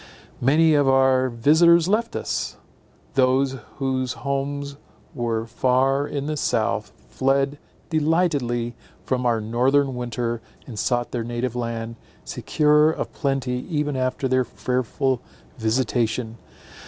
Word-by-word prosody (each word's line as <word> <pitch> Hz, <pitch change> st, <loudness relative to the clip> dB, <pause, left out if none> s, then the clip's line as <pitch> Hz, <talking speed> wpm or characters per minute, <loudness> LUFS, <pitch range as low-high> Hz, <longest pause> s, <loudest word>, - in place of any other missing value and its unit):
Many 155 Hz, +5 st, +4 dB
of 145 Hz, -2 st, +4 dB
our 130 Hz, -1 st, +4 dB
visitors 160 Hz, +8 st, +5 dB
left 225 Hz, +4 st, 0 dB
us: -, -, -3 dB, 0.6 s
those 135 Hz, +1 st, +2 dB, 0.2 s
whose 130 Hz, -2 st, -1 dB
homes 140 Hz, 0 st, -3 dB, 0.4 s
were 115 Hz, -4 st, -2 dB
far 130 Hz, +4 st, +1 dB
in 140 Hz, -1 st, -3 dB
the 155 Hz, +1 st, -2 dB
south, -, -, 0 dB, 0.2 s
fled 135 Hz, +2 st, +1 dB, 0.3 s
delightedly 145 Hz, -7 st, +1 dB, 0.3 s
from 125 Hz, -1 st, 0 dB
our 115 Hz, -2 st, +2 dB
northern 130 Hz, +5 st, +2 dB
winter, 120 Hz, -1 st, -3 dB, 0.2 s
and 115 Hz, -5 st, -7 dB
sought 120 Hz, -1 st, 0 dB
their 120 Hz, -2 st, -2 dB
native 120 Hz, +1 st, -3 dB
land, 115 Hz, -1 st, -4 dB, 0.3 s
secure 150 Hz, 0 st, +3 dB
of 160 Hz, -, -3 dB
plenty 135 Hz, -3 st, -1 dB
even 150 Hz, -3 st, -1 dB
after 130 Hz, +1 st, -1 dB
their 130 Hz, 0 st, +2 dB
fearful 130 Hz, +1 st, -1 dB, 0.4 s
visitation. 115 Hz, 0 st, 0 dB
130 Hz, 115 wpm, -23 LUFS, 120-145 Hz, 0.6 s, visitors